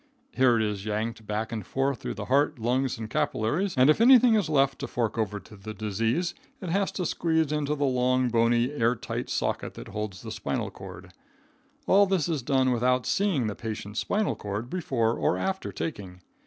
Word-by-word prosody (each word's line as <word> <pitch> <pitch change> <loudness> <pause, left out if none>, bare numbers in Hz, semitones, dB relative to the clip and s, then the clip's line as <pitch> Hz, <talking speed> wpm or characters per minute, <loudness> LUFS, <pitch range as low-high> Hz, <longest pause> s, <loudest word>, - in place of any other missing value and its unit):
Here 130 - +4
it 110 - +1
is 105 -2 -2
yanked 110 +1 -3
back 110 +2 -2
and 110 -3 -4
forth 135 +5 -1
through - - -5
the - - -5
heart, 140 +2 +2
lungs 125 +3 0
and 110 -1 -5
capillaries, 150 - -1
and 130 +1 +6
if 155 +8 +4
anything 245 -1 +7
is 205 -7 +2
left 135 -3 +2
to - - -4
fork 115 -3 -2
over 105 -3 -2
to 105 - -15
the 105 +2 -8
disease, 115 - -1 0.3
it 185 - -6
has 195 +3 +1
to 180 - -2
squeeze 160 -2 0
into 150 -1 0
the 145 -1 0
long, 130 -1 +2
bony, 120 +2 +2
air 120 -4 +1
tight - - -5
socket - - -2
that - - -9
holds 105 -2 -5
the - - -6
spinal - - -3
cord. 95 -1 -11 0.7
All 200 +1 +5
this 185 -5 +1
is 160 -5 -1
done 130 0 +2
without 125 +1 +1
seeing 190 - +1
the 105 - -2
patient's 105 -1 -5
spinal 210 - 0
cord 105 +4 -5
before 130 -11 0
or 155 - 0
after 190 0 -2
taking. 95 - -6
125 Hz, 195 wpm, -27 LUFS, 110-155 Hz, 0.7 s, anything